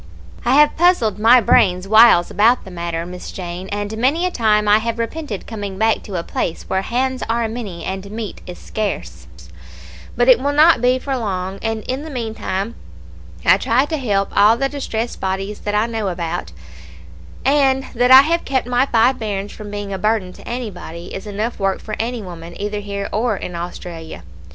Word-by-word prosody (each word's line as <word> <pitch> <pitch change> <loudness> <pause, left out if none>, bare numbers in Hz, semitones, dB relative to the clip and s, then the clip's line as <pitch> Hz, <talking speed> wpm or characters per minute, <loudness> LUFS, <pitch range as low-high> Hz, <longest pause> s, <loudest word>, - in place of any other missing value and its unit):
I 250 +2 +3
have 295 +1 +5
puzzled 295 - +3
my 235 +4 +7
brains 185 -3 +3
whiles 220 -4 +6
about 230 +4 +3
the 190 - -10
matter, 170 -1 -4
Miss 180 +1 -8
Jane, 180 0 -6
and 205 +1 -3
many 280 +9 +1
a 365 - 0
time 210 -6 +2
I 210 +1 +6
have 230 +1 -3
repented 230 -2 -4
coming 205 -4 -6
back 220 +1 +2
to 200 - -8
a 170 - -2
place 165 - -3
where 190 - -1
hands 255 +5 -1
are 230 0 +1
many 215 -6 -6
and 190 +1 -5
meat 215 0 -6
is 180 - -8
scarce; 215 -2 -5 0.9
but 245 +1 +3
it 250 -3 +7
will 285 +2 -1
not 305 -3 +5
be 250 +1 +3
for 270 +1 -3
long; 195 -5 -3
and 225 -1 -2
in 260 +2 -3
the 315 - -8
meantime 225 -4 -3 0.7
I - - +6
try 250 +5 +2
to 315 +1 -3
help 200 -7 -1
all 210 +3 +5
the 275 - +1
distressed 240 -5 -4
bodies 195 +2 -3
that 205 0 -3
I 210 +1 +3
know 225 -3 -3
about; 170 - -3 0.9
and 270 -1 +3
that 245 0 +2
I 260 +1 +11
have 335 +3 0
kept 265 -2 -1
my 250 +2 +1
five 245 +2 +3
bairns 205 -2 -3
from 210 -1 -9
being 205 -1 -5
a 190 - -4
burden 210 -3 0
to - - -15
anybody, 185 -8 -6
is 195 - -7
enough 215 +3 -3
work 195 -1 0
for 215 - -6
any 235 0 -3
woman 170 -2 -9
either 205 +1 -3
here 200 -1 -4
or 220 -1 0
in 180 - -6
Australia. 170 - -7
215 Hz, 195 wpm, -19 LUFS, 195-245 Hz, 0.9 s, I